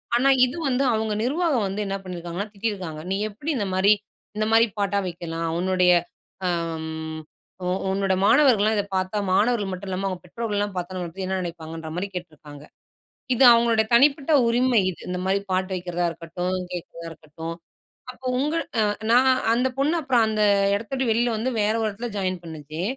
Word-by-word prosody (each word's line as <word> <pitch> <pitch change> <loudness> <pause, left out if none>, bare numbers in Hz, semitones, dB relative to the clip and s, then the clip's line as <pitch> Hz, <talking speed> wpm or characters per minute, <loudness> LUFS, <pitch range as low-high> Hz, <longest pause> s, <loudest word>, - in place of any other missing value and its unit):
ஆனா, 260 +3 +4 0.2
இது 255 - -5
வந்து, 265 +1 +1
அவுங்க 220 -1 -1
நிர்வாகம் 280 0 +1
வந்து 195 +2 -3
என்ன 195 0 -2
பண்ணிருக்காங்கன்னா 180 +3 -5
திட்டிருக்காங்க. 195 -7 -4
நீ - - +1
எப்பிடி 235 +10 -4
இந்தமாரி, 195 -1 +3 0.4
இந்தமாரி 220 +2 +4
பாட்டா 200 0 0
வைக்கலாம்? 165 -1 -4
உன்னுடைய. 180 0 +3 0.5
அ, - - +2 0.4
ம். 160 0 -5 0.4
உ - - -1 0.2
உன்னோட 195 0 +1
மாணவர்கள்லாம் 220 -3 +5
இதப் 200 -1 -3
பார்த்தா 185 +2 -1
மாணவர்கள் 205 0 +2
மட்டுமல்லாம, 185 +1 -4
அவுங்க 185 -2 -4
பெற்றோர்கள்லாம் 205 0 -3
பார்த்தா 180 +1 -4
நம்பளப்பத்தி 180 +1 -5
என்ன 190 0 -1
நினைப்பாங்கன்றமாரி 165 +1 -5
கேட்டுருக்காங்க. 155 -4 -9 0.7
இது 260 - +4
அவுங்களோட 230 -1 +3
தனிப்பட்ட 280 +4 +4 0.2
உரிமை 240 -1 +3
இது. 180 - -7
இந்தமாரி 190 +2 0
பாட்டு 185 +1 0
வைக்கிறதா 175 -1 -2
இருக்கட்டும், 175 +3 -4 0.2
கேட்கிறதா 170 -1 -7
இருக்கட்டும். 160 +1 -8 0.6
அப்போ 255 +1 -16
உங்க 300 +4 0 0.3
அ - - +4 0.3
நான் 255 +2 +5 0.2
அந்தப் 250 +2 0
பொண்ணு, 295 +5 +2
அப்புறம் 245 -4 +3
அந்த 215 -1 +1 0.3
இடத்த 220 +4 -6
விட்டு 260 -2 0
வெளில 235 +2 +2
வந்து 245 +4 -1
வேற 210 +1 +2
ஒரு 215 - +1
இடத்துல 230 +4 -5
ஜாயின் 185 -2 -2
பண்ணுச்சு. 155 0 -7
195 Hz, 155 wpm, -24 LUFS, 175-230 Hz, 0.7 s, மாணவர்கள்லாம்